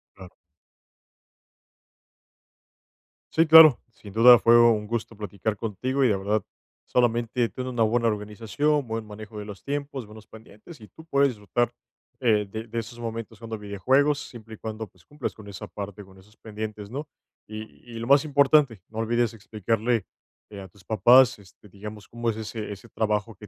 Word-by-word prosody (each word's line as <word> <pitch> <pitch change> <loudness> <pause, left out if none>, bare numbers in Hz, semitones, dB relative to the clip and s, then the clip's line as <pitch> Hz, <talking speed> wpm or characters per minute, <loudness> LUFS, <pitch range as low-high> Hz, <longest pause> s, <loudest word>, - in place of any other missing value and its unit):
Claro. 95 -2 -12 3.0
Sí, 165 +1 +3
claro. 155 -4 +9
Sin 100 -2 -13
duda 120 +2 +8
fue 120 0 +6
un 110 -3 +4
gusto 115 0 -4
platicar 105 +1 -4
contigo 115 +6 -2
y, 130 - +5
de 100 - +1
verdad, 100 +1 -1 0.4
solamente 120 0 +1
ten 130 0 -6
una 120 -3 0
buena 115 +1 +1
organización, 115 +8 -1
buen 110 0 -4
manejo 105 0 -10
de 105 - -7
los 100 -2 -10
tiempos, 140 -3 -4
buenos 105 0 -14
pendientes, 110 - -15
y 105 - -12
tú 160 - -15
puedes 140 -3 +3
disfrutar, 120 +1 -1 0.5
eh, 110 -5 +2
de 110 +2 -6
de 115 +1 -3
esos 120 +1 -8
momentos 115 -1 -6
jugando 115 -1 -6
videojuegos, 130 +9 +1
siempre 110 -2 -10
y - - -18
cuando, 110 0 -6
pues, 90 -2 -27
cumplas 145 -3 -5
con 105 -2 -14
esa 100 -1 -8
parte, 100 0 -8
con 95 0 -18
esos 105 +4 -20
pendientes, 105 -1 -7
¿no?, 145 +5 -6 0.4
y 110 0 -6 0.3
y - - -5
lo 115 - -5
más 140 +2 +5
importante, 140 -6 +3
no 110 0 -7
olvides 120 0 0
explicarle, 110 +1 -1 0.4
eh, 100 -2 -9
a 95 - -9
tus 95 +1 -22
papás, 120 +3 +5
este, 100 +1 -19
digamos, 105 +1 -10
cómo 120 0 -3
es 110 - -1
ese 110 -1 -6
ese 100 - -14
trabajo 105 0 -1
que 105 - -13
110 Hz, 175 wpm, -25 LUFS, 105-120 Hz, 3.0 s, claro